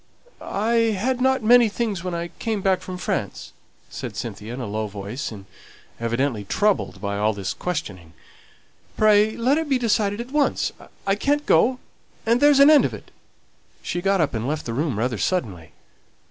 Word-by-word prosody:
"I 225 +1 +1
hadn't 260 +3 +1
many 240 0 +6
things 205 -4 -3
when 180 -2 -3
I 170 0 -4
came 220 -4 -2
back 190 -1 +2
from 185 -1 -7
France," - - -4 0.4
said - - -6
Cynthia, 110 +2 -6
in - - -7
a 125 - -4
low 110 +1 -3
voice, 105 +8 -6
and 100 -3 -10 0.5
evidently 115 -1 -1
troubled 205 - 0
by 100 0 -3
all 105 +1 +2
this 100 -1 -4
questioning. 95 - -5 0.8
"Pray 215 0 +4
let 260 +6 +2
it 320 -2 -4
be 270 - +3
decided 215 -3 0
at 240 +2 -6
once; 295 -1 +1 0.3
I 195 - +2
can't 290 +8 0
go, 250 +1 +3 0.5
and 235 +2 +2
there's 290 -1 +6
an 280 +2 +8
end 300 - +7
of - - -1
it." - - -14 0.7
She 175 - -3
got 195 +1 +2
up, 150 -4 +1
and 115 +1 -2
left 150 +1 -3
the 115 - -4
room 140 -2 -1
rather 120 -1 -1
suddenly. 95 - -2
185 Hz, 175 wpm, -23 LUFS, -, 0.8 s, an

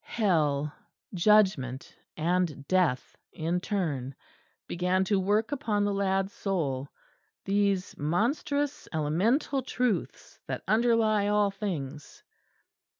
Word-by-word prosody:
Hell, 150 -9 +1 0.4
Judgment 180 - +2 0.2
and 165 -4 0
Death 180 -9 +1 0.2
in 165 +3 -1
turn 145 - -2 0.5
began 180 +2 0
to 195 0 +1
work 210 +5 +1
upon 225 -8 0
the 205 - 0
lad's 195 0 0
soul 145 - -2 0.6
these 200 -1 +1
monstrous 280 - -1
elemental 195 - +1
Truths 245 -7 -2
that - - -4
underlie 220 -1 +3
all 205 -1 +2
things. 155 -8 -6
190 Hz, 95 wpm, -28 LUFS, 155-215 Hz, 0.6 s, underlie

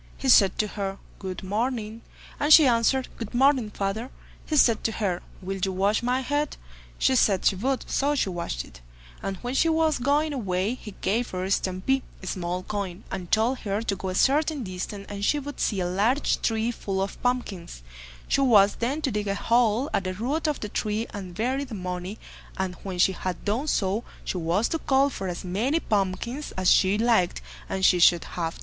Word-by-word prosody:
He 270 - -2
said 195 -6 +6
to 215 - +2
her 195 -2 -4 0.2
"Good 190 -1 -6
morning." 220 +2 -2 0.4
And 295 +1 +1
she 310 -1 +10
answered, 250 +2 +2
"Good 225 0 -6
morning, 260 -3 +3
father." 205 +4 -3 0.4
He 310 - -1
said 230 -5 +4
to 225 - +1
her, 190 -5 -1 0.2
"Will 195 +1 -4
you 190 - +1
wash 200 +3 +1
my 250 +2 0
head?" 290 +3 -1 0.4
She 265 - +3
said 200 -6 +3
she - - +4
would, 260 +7 -1
so 285 +2 +1
she 255 - 0
washed 170 - -4
it, - - -16 0.4
and 195 -1 -3
when 245 +1 -3
she 325 +4 +3
was 320 -2 +2
going 290 +4 +1
away, 200 -4 -1
he 215 -5 -10
gave 230 +5 0
her 185 0 -3
a 190 - -3
"stampee," 195 +9 0 1.1
and 180 -2 -5
told 230 +4 +2
her 205 +1 -2
to 205 -3 -1
go 190 0 -5
a 185 - -3
certain 295 - +2
distance, 195 +1 -6
and 200 0 -6
she 295 - +3
would 290 -1 -6
see 205 - 0
a - - 0
large 210 +10 +1
tree 225 +1 0
full 195 -4 -3
of 195 +1 -3
pumpkins; 205 - -3 0.4
she - - +2
was 205 -6 +5
then 275 +7 -2
to 270 - +1
dig 210 -1 -2
a 200 - 0
hole 235 +3 +2
at 190 - 0
the 185 0 -3
root 280 - -1
of 300 - -1
the 210 - -4
tree 215 +2 -1
and 185 -4 -7
bury 255 +7 0
the 255 -5 -7
money, 180 +2 -5 0.4
and 190 -1 -2
when 190 -2 -5
she 180 - +4
had 185 -1 -5
done 225 +9 0
so, 200 -3 0 0.2
she - - -3
was 175 +6 +1
to 325 - -2
call 275 0 +2
for 195 - -5
as 175 +1 -5
many 230 - 0
pumpkins 215 - -2
as 185 -1 +2
she 190 +2 +4
liked, 225 -6 +2 0.3
and 190 -1 0
she 180 - +5
should 175 0 +5
have 165 -2 -4
them. - - -14
215 Hz, 205 wpm, -26 LUFS, 190-260 Hz, 1.1 s, she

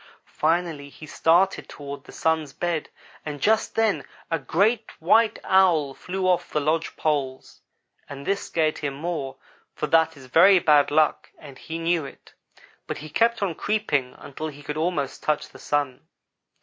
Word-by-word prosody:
Finally 160 -3 -1
he 155 - -12
started 175 +5 +2
toward 140 -1 -8
the - - -12
Sun's 160 -3 -1
bed 170 -3 -2 0.3
and 150 -2 -6
just 220 +8 +1
then 225 -2 +1 0.3
a 165 - +1
great 210 - +1
white 220 +7 +3
Owl 170 -7 +3
flew 190 +7 -5
from - - +2
off 180 -1 +1
the 150 - 0
lodge 155 +3 -1
poles, 140 -4 -2 0.5
and 140 -1 -8
this 200 0 0
scared 155 -2 0
him 140 -2 -3
more, 145 -3 -4 0.4
for - - -2
that 160 -1 +2
is 135 - -13
very 175 +9 +6
bad 150 -4 +4
luck 155 0 +2
and 140 -3 -12
he 160 - -6
knew 165 -1 0
it; 135 - -12 0.5
but - - -4
he 155 0 -9
kept 230 +2 +2
on 185 -4 0
creeping 150 -12 -1
until 155 +3 -7
he 145 -1 -10
could 150 - -5
almost 155 -4 -2
touch 150 - -1
the - - -15
Sun. 145 -3 -1
155 Hz, 170 wpm, -24 LUFS, 145-180 Hz, 0.5 s, very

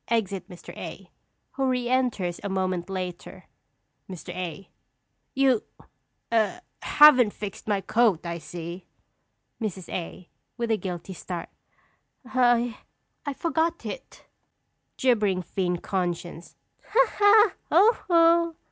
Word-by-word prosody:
Exit 200 -4 -1
Mr. 180 -2 -11
A., - - -9 0.4
who 270 -1 -1
re 250 -1 0
enters 240 -9 0
a 200 - -3
moment 185 -2 -1
later._] 185 -2 -6 0.7
Mr. 185 -3 -8
A. 180 +1 -5 0.7
You 265 -4 +3 0.7
a 230 +10 +1 0.2
haven't 260 -8 +6
fixed 205 0 -7
my 205 -2 +1
coat, 215 -6 +2
I 170 0 -4
see. 170 +2 -8 0.7
Mrs. 190 -5 -4
A. 180 0 -6 0.3
(with 235 -1 -1
a 220 - +3
guilty 185 -1 -6
start). 175 0 -6 0.8
I 245 -2 +2 0.5
I 285 - -1
forgot 330 +2 -1
it! - - -8 0.7
Gibbering 210 -8 +2
Fiend 180 -1 -2
Conscience. 175 -2 -3 0.3
Ha, 445 - +1
ha! 420 -1 +5 0.2
Ho, 405 +9 +5
ho! 335 -1 +4
210 Hz, 115 wpm, -26 LUFS, 180-260 Hz, 0.8 s, haven't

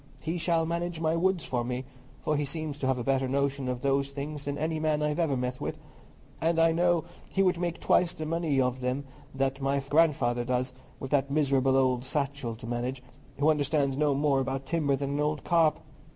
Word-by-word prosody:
He 165 +2 -2
shall 165 -1 +2
manage 170 0 -2
my 160 0 +1
woods 180 0 +1
for 120 -2 -1
me, 125 +2 -3 0.4
for 150 - 0
he 145 - 0
seems 150 +1 -4
to 130 - -1
have 130 -1 +2
a 120 - -3
better 135 +1 +1
notion 140 0 0
of 125 -1 -2
those 140 0 +1
things 145 +1 -6
than 145 0 -2
any 160 +1 -1
man 155 -1 +1
I 150 - +1
ever 150 -3 0
met 125 0 -3
with; - - -3 0.6
and 165 +1 +2
I 165 0 +5
know 175 0 +2 0.3
he 195 - +2
would 180 -2 +2
make 175 -1 -2
twice 175 -1 +3
the 155 - -6
money 160 -3 0
of 125 0 0
them 125 +3 -1 0.3
that 135 0 -1
my 135 +1 +1
grandfather 135 -4 +2
does, 125 +1 -1 0.3
with 135 - -6
that 140 -1 +2
miserable 135 -2 +2
old 130 -2 +2
Satchell 140 -3 -2
to 115 - -10
manage, 125 +2 -3 0.3
who 145 +3 +4
understands 145 -2 +1
no 145 0 +2
more 140 -1 +2
about 135 +1 -2
timber 150 -3 +1
than 140 +1 -3
an 145 - -1
old 150 0 0
carp. 165 -3 +3
140 Hz, 210 wpm, -28 LUFS, 135-160 Hz, 0.6 s, I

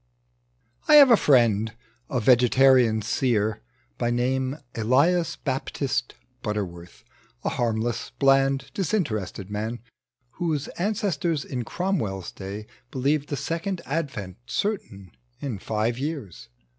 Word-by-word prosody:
I 305 - +7
H4VE 280 -4 +9
a - - +10
friend, 115 - +3 0.4
a 130 -5 0
vegetarian 125 -1 +5
seer, 110 -2 0 0.4
By 120 - +1
name 130 +3 0 0.2
Eliaa 155 +9 +2
Baptist 135 -1 -2 0.3
Butterworth, 90 -6 -5 0.4
A - - +1
harmless, 115 -1 -1
bland, 135 0 +3
disinterested 110 - -2
man, 110 +3 -3 0.6
Whose 155 -5 -1
ancestors 175 -6 -1
in 125 -2 -3
Cromwell's 110 - -2
day 100 +2 -7 0.2
believed 140 +3 0
The 145 - -2
Second 170 +4 -3
Advent 130 - -3
certain 110 - -3 0.3
in 120 -8 -4
five 110 +4 -1
years. 140 - -5
130 Hz, 105 wpm, -25 LUFS, 110-150 Hz, 0.6 s, a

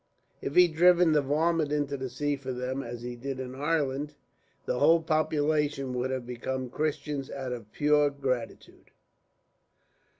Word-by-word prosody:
If 140 - -4
he'd 180 -2 +6
driven 175 0 +5
the 150 -1 +4
varmint 155 +2 +1
into 145 -1 0
the 130 -1 -4
sea 145 +3 -1
for 135 -1 -6
them, 125 +2 -3
as 120 -1 -7
he 120 0 -5
did 130 +2 -5
in 130 -1 -5
Ireland, 145 0 -1 0.5
the 125 - -1
whole 165 +3 +6
population 150 -3 0
would 125 +1 -1
have 130 -2 -3
become 125 +1 -4
Christians, 150 -2 -2
out 135 -2 -5
of 115 -4 -7
pure 150 0 +3
gratitude. 130 -4 -4
140 Hz, 155 wpm, -28 LUFS, 130-150 Hz, 0.5 s, he'd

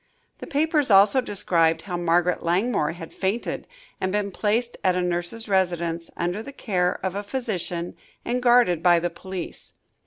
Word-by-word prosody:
The - - -8
papers 300 -1 +1
also 200 +5 +6
described 170 -7 +1
how 180 -3 -4
Margaret 175 +1 +1
Langmore 175 -2 +1
had 165 -1 -10
fainted 200 +5 -2 0.3
and 185 - -1
been 205 0 -1
placed 225 +5 0
at 185 -1 +3
a 180 - +1
nurse's 175 +6 -2
residence, 170 -4 0
under 175 +5 -1
the 280 - -8
care 180 -9 -1
of 190 - -1
a 200 - -3
physician 200 -7 -3 0.3
and 250 +1 -1
guarded 240 -9 +4
by 175 0 +5
the 175 +1 -1
police. 185 +1 -7
185 Hz, 160 wpm, -24 LUFS, 175-220 Hz, 0.3 s, also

